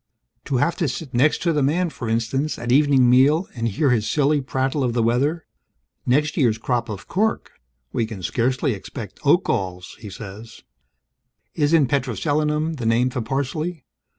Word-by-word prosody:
To 135 - 0
have 170 +7 +1
to 170 - 0
sit 135 +1 -5
next 135 +6 +2
to 170 -2 +2
the 150 - +1
man, 165 +5 +1
for 115 - -6
instance, 120 +7 -1
at 120 +1 -3
evening 135 -2 +4
meal 140 +8 +4
and 115 -2 -2
hear 130 +6 +1
his 110 -3 +1
silly 145 0 +2
prattle 130 +1 -1
of 120 -2 0
the 115 -1 +1
weather. 140 +8 0 0.6
Next 145 +4 +2
year's 120 -8 +2
crop 120 0 -2
of 100 -2 -7
cork: 220 +4 -1 0.4
we 115 - 0
can 105 -5 -8
scarcely 130 - 0
expect 100 - -8
oak - - +4
galls, 90 -1 -3
he 105 - -9
says. 105 +3 -10 0.9
Isn't 150 0 +3
petroselinum 150 +3 -1
the 120 - -5
name 120 +3 +2
for 125 - -3
parsley? 140 +5 -3
130 Hz, 170 wpm, -22 LUFS, 115-150 Hz, 0.9 s, evening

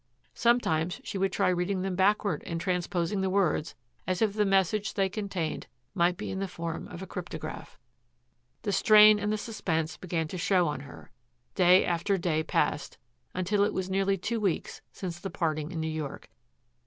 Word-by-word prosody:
Sometimes 180 -8 +1
she 195 - -4
would 195 0 +1
try - - +2
reading 185 +1 0
them 190 -1 -2
backward 195 -3 +2
and 165 -1 -3
transposing 180 +1 -1
the 190 - 0
words, 185 -5 +1 0.3
as 185 -1 0
if 215 -3 +2
the 210 0 +2
message 195 +2 +1
they 195 -1 +2
contained 190 -6 -3 0.3
might 175 -2 +2
be - - -5
in 190 - -3
the 195 - -2
form 165 -2 -5
of 180 +1 -8
a - - -5
cryptograph. 165 -4 -7 0.9
The 205 - -1
strain 210 +1 +7
and 205 +1 -1
the 215 - 0
suspense 170 -8 -2
began 165 -3 -2
to 180 - -5
show 180 0 +3
on 150 -2 -2
her. 140 -1 -12 0.4
Day 185 0 +5
after 175 +3 0
day 165 -3 0
passed, - - -1 0.4
until 195 +3 +1
it 205 - 0
was 190 0 -2
nearly 195 0 +1
two 230 +5 -2
weeks 195 -6 -2
since 175 -3 -6
the 195 - -5
parting 155 -2 -2
in 170 - -4
New 160 - -1
York. 155 -7 -5
185 Hz, 180 wpm, -29 LUFS, 170-200 Hz, 0.9 s, strain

